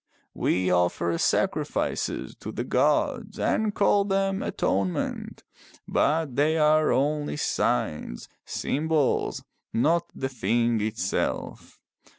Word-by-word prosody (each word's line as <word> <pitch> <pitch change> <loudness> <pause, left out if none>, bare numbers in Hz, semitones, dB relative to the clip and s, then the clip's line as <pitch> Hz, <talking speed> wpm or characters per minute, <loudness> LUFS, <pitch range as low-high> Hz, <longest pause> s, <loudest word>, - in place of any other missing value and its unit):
We 90 0 +1
offer 85 -1 +1
sacrifices - - -1
to - - -6
the - - -3
gods - - +1
and 215 -1 +1
call 200 0 +3
them 195 0 0
atonement. 95 -2 -2 0.4
But 155 -4 +1
they 155 +3 +2
are 155 0 +4
only 145 +2 0
signs, - - -1 0.2
symbols, 155 -1 0 0.3
not 165 +8 +2
the 135 - -2
thing 120 -2 +1
itself. 105 -3 -3
140 Hz, 100 wpm, -26 LUFS, 100-160 Hz, 0.4 s, are